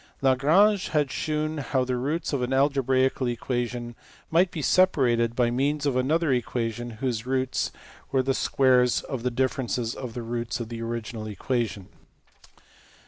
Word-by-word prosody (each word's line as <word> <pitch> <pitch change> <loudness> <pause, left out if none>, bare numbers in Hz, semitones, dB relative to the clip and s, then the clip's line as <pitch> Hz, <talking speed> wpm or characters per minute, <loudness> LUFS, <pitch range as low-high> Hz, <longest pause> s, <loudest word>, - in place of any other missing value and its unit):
Lagrange 165 +10 +4
had 150 -3 0
shewn 155 0 -2
how 130 -2 0
the 125 0 -1
roots 145 +7 -2
of 140 - 0
an 125 +1 -2
algebraical 130 -1 +2
equation 120 0 -3 0.4
might 175 +3 +4
be 160 -4 -5
separated 120 -11 +3
by 120 -1 +2
means 145 +4 0
of 140 -3 +1
another 145 +4 +2
equation 120 -1 -2
whose 120 -2 -2
roots 130 -1 0 0.4
were 130 -1 +2
the 135 +1 +1
squares 125 -2 +3
of 130 -3 -5
the 125 - 0
differ 130 +3 0
ences 120 -1 -2
of 125 -4 -7
the 120 - -4
roots 115 +1 -3
of 115 -2 -5
the 115 -1 -6
original 115 -1 -4
equation. 110 -1 -2
130 Hz, 155 wpm, -26 LUFS, 120-140 Hz, 0.4 s, Lagrange